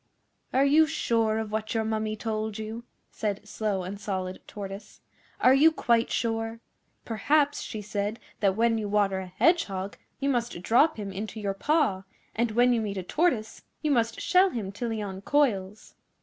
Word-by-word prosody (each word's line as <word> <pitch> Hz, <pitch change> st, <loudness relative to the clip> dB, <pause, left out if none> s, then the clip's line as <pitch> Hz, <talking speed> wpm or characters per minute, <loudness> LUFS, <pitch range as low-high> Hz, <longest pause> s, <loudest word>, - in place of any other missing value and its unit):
'Are 270 Hz, +2 st, +3 dB
you 310 Hz, +3 st, +5 dB
sure 230 Hz, -8 st, +1 dB
of 220 Hz, -1 st, -3 dB
what 220 Hz, +1 st, -2 dB
your 225 Hz, -, +2 dB
Mummy 215 Hz, -1 st, -1 dB
told 215 Hz, -1 st, -3 dB
you?' 220 Hz, +2 st, -6 dB, 0.3 s
said 210 Hz, -1 st, -3 dB
Slow 205 Hz, -3 st, -2 dB
and 195 Hz, +3 st, -6 dB
Solid 185 Hz, -2 st, -3 dB
Tortoise. 200 Hz, 0 st, -8 dB, 0.4 s
'Are 255 Hz, -, +6 dB
you 300 Hz, +4 st, +6 dB
quite 235 Hz, -6 st, +2 dB
sure? 225 Hz, 0 st, -1 dB, 0.5 s
Perhaps 285 Hz, +7 st, +1 dB
she 215 Hz, -2 st, -6 dB
said 205 Hz, +2 st, -3 dB, 0.2 s
that 195 Hz, -2 st, +2 dB
when 230 Hz, 0 st, +2 dB
you 210 Hz, -2 st, -3 dB
water 200 Hz, -2 st, +2 dB
a 190 Hz, -, -6 dB
Hedgehog 195 Hz, -, +1 dB, 0.2 s
you 275 Hz, -, -1 dB
must 240 Hz, -9 st, -1 dB
drop 285 Hz, -, +4 dB
him 200 Hz, -2 st, -5 dB
into 210 Hz, +3 st, -5 dB
your 200 Hz, -2 st, -1 dB
paw, 245 Hz, -3 st, +1 dB, 0.3 s
and 235 Hz, +1 st, +1 dB
when 245 Hz, +2 st, +4 dB
you 230 Hz, -, +1 dB
meet 200 Hz, -2 st, -3 dB
a 185 Hz, -, -3 dB
Tortoise 245 Hz, -, 0 dB, 0.2 s
you 305 Hz, -, +1 dB
must 230 Hz, -3 st, +1 dB
shell 370 Hz, +2 st, +4 dB
him 215 Hz, -, -4 dB
till 235 Hz, +4 st, -4 dB
he 220 Hz, -2 st, -2 dB
uncoils. 200 Hz, 0 st, -1 dB
220 Hz, 175 wpm, -27 LUFS, 200-240 Hz, 0.5 s, Are